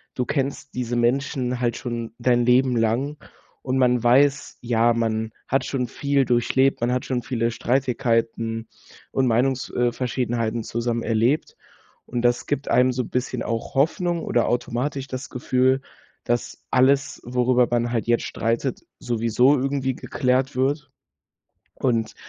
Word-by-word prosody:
du 125 Hz, -, -1 dB
kennst 140 Hz, 0 st, -3 dB
diese 125 Hz, -1 st, -2 dB
Menschen 125 Hz, +1 st, 0 dB
halt 120 Hz, -2 st, 0 dB
schon 120 Hz, -2 st, -5 dB
dein 120 Hz, 0 st, +2 dB
Leben 125 Hz, +1 st, +4 dB
lang, 120 Hz, +7 st, 0 dB, 0.5 s
und 130 Hz, 0 st, -1 dB
man 125 Hz, -2 st, +3 dB
weiß, 135 Hz, +4 st, +3 dB
ja, 120 Hz, 0 st, +2 dB
man 110 Hz, -1 st, -1 dB, 0.2 s
hat 135 Hz, 0 st, +1 dB
schon 130 Hz, -3 st, -2 dB
viel 140 Hz, -1 st, +1 dB
durchlebt, 125 Hz, +3 st, +2 dB
man 120 Hz, +1 st, +1 dB
hat 125 Hz, -, -1 dB
schon 125 Hz, -2 st, -2 dB
viele 115 Hz, -1 st, -1 dB
Streitigkeiten 115 Hz, -3 st, 0 dB, 0.4 s
und 135 Hz, -, +1 dB
Meinungs 125 Hz, +3 st, +1 dB
äh, 120 Hz, 0 st, +1 dB
verschiedenheiten 120 Hz, -2 st, -2 dB
zusammen 115 Hz, 0 st, -2 dB
erlebt, 115 Hz, +6 st, +1 dB, 0.5 s
und 120 Hz, 0 st, -3 dB
das 120 Hz, 0 st, +2 dB
gibt 145 Hz, -1 st, -2 dB
einem 125 Hz, +1 st, +4 dB
so 125 Hz, -1 st, -2 dB
bisschen 125 Hz, 0 st, -3 dB
auch 115 Hz, 0 st, -3 dB
Hoffnung 170 Hz, +4 st, +1 dB
oder 120 Hz, -, +1 dB
automatisch 125 Hz, +3 st, -2 dB
das 130 Hz, 0 st, -6 dB
Gefühl, 130 Hz, +1 st, +1 dB, 0.4 s
dass 120 Hz, 0 st, -2 dB
alles, 135 Hz, +2 st, +2 dB
worüber 125 Hz, 0 st, +2 dB
man 120 Hz, 0 st, 0 dB
halt 115 Hz, -2 st, -1 dB
jetzt 120 Hz, 0 st, +2 dB
streitet, 115 Hz, +3 st, -2 dB, 0.2 s
sowieso 120 Hz, +4 st, +2 dB
irgendwie 135 Hz, -1 st, -1 dB
geklärt 130 Hz, 0 st, 0 dB
wird. 140 Hz, +2 st, -1 dB, 0.8 s
Und 115 Hz, -3 st, -1 dB
125 Hz, 145 wpm, -23 LUFS, 120-135 Hz, 0.8 s, Leben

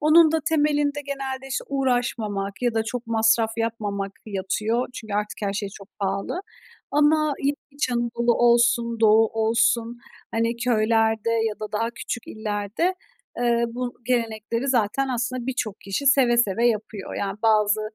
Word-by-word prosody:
Onun 315 Hz, +1 st, +6 dB
da 320 Hz, -, +2 dB
temelinde 295 Hz, -2 st, +1 dB
genelde, 270 Hz, -1 st, -4 dB
işte, 255 Hz, -, -3 dB
uğraşmamak 235 Hz, -6 st, -1 dB
ya 240 Hz, -2 st, +1 dB
da 225 Hz, -, +2 dB
çok 240 Hz, +1 st, -5 dB
masraf 225 Hz, 0 st, +3 dB
yapmamak 205 Hz, -3 st, -2 dB
yatıyor 215 Hz, +4 st, -1 dB
çünkü 215 Hz, -4 st, -6 dB
artık 210 Hz, 0 st, -2 dB
her 200 Hz, -, 0 dB
şey 200 Hz, 0 st, -3 dB
çok 195 Hz, 0 st, -12 dB
pahalı. 200 Hz, -, -2 dB, 0.5 s
Ama 300 Hz, 0 st, +3 dB
yine 285 Hz, +1 st, +1 dB
İç 285 Hz, -2 st, -2 dB
Anadolu 235 Hz, 0 st, +1 dB
olsun 235 Hz, -1 st, +3 dB
Doğu 220 Hz, 0 st, +6 dB
olsun, 230 Hz, +1 st, +1 dB, 0.3 s
hani, 230 Hz, +1 st, 0 dB
köylerde 225 Hz, -1 st, +2 dB
ya 225 Hz, -2 st, +1 dB
da 215 Hz, 0 st, -6 dB
daha 230 Hz, +2 st, 0 dB
küçük 240 Hz, 0 st, -6 dB
illerde, 215 Hz, -, -2 dB, 0.4 s
eee, 235 Hz, -1 st, +2 dB
bu 245 Hz, +1 st, -4 dB
gelenekleri 230 Hz, +1 st, -1 dB
zaten 255 Hz, +2 st, +1 dB
aslında 250 Hz, 0 st, -2 dB
birçok 230 Hz, -6 st, -3 dB
kişi 200 Hz, +9 st, -3 dB
seve 260 Hz, -4 st, +5 dB
seve 235 Hz, +1 st, +2 dB
yapıyor. 215 Hz, -3 st, -2 dB
Yani, 195 Hz, 0 st, -3 dB
bazı, 215 Hz, -1 st, +3 dB
230 Hz, 145 wpm, -24 LUFS, 215-255 Hz, 0.5 s, Onun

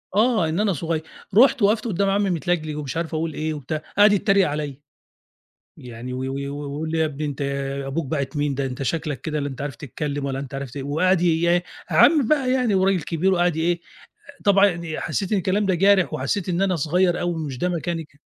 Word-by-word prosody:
آه 215 Hz, -6 st, +3 dB
إن 160 Hz, +4 st, -1 dB
أنا 210 Hz, -2 st, +2 dB
صغيّر، 160 Hz, +1 st, -2 dB, 0.4 s
رُحت 255 Hz, 0 st, +6 dB
وقَفت 210 Hz, +3 st, +3 dB
قُدّام 200 Hz, -1 st, +1 dB
عمّي 200 Hz, 0 st, +1 dB
متلجلِج 165 Hz, -3 st, -1 dB
ومش 145 Hz, -1 st, -4 dB
عارف 165 Hz, 0 st, -3 dB
أقول 160 Hz, 0 st, -2 dB
إيه 155 Hz, +1 st, -2 dB
وبتاع، 150 Hz, +1 st, -4 dB, 0.2 s
قعَد 205 Hz, 0 st, +7 dB
يتّريق 195 Hz, -1 st, +3 dB
عليَّ، 145 Hz, -2 st, -4 dB, 1.0 s
يعني 125 Hz, 0 st, -8 dB
و 125 Hz, -, -4 dB
و 135 Hz, 0 st, -3 dB
ويقول 145 Hz, +2 st, -4 dB
لي: 165 Hz, -, -1 dB
"يا 160 Hz, -, +3 dB
ابني 150 Hz, -1 st, -4 dB
أنت 145 Hz, -1 st, -4 dB, 0.4 s
أبوك 145 Hz, +3 st, -2 dB
باعت 140 Hz, +1 st, -3 dB
مين، 145 Hz, -1 st, 0 dB
ده 140 Hz, +1 st, -2 dB
أنت 130 Hz, +1 st, -5 dB
شكلك 150 Hz, -1 st, -2 dB
كده 150 Hz, +1 st, -3 dB
لا 145 Hz, -, -2 dB
أنت 135 Hz, -2 st, -8 dB
عارف 140 Hz, -4 st, -4 dB
تتكلّم 145 Hz, +3 st, -4 dB
ولا 135 Hz, -1 st, -2 dB
أنت 140 Hz, 0 st, -7 dB
عارف 135 Hz, -2 st, -5 dB
ت" 125 Hz, -, -14 dB
وقعَد 165 Hz, +6 st, +2 dB
ي 175 Hz, -, +2 dB, 0.2 s
إيه، 175 Hz, 0 st, +2 dB, 0.3 s
عمّي 310 Hz, -3 st, +6 dB
بقى 270 Hz, -4 st, +2 dB
يعني 250 Hz, -5 st, +2 dB
وراجل 190 Hz, -2 st, +2 dB
كبير 170 Hz, +5 st, 0 dB
وقعَد 175 Hz, -2 st, +2 dB
ي -, -, -1 dB
إيه، 170 Hz, +1 st, +1 dB, 0.5 s
آآ 280 Hz, -, -22 dB
طبعًا 200 Hz, -1 st, +6 dB
يعني 170 Hz, -4 st, -3 dB
حسّيت 190 Hz, +5 st, -2 dB
إن 205 Hz, -, +3 dB
الكلام 195 Hz, +3 st, 0 dB
ده 190 Hz, -, +2 dB
جارح 195 Hz, 0 st, +4 dB
وحسّيت 155 Hz, +7 st, -2 dB
إن 180 Hz, +1 st, 0 dB
أنا 190 Hz, -2 st, +2 dB
صغيّر 175 Hz, +4 st, +1 dB
أوي 175 Hz, 0 st, -1 dB
ومش 150 Hz, -6 st, -5 dB
ده 180 Hz, -, 0 dB
مكاني 170 Hz, -1 st, -2 dB
ك 145 Hz, -1 st, -26 dB
165 Hz, 220 wpm, -23 LUFS, 145-190 Hz, 1.0 s, قعَد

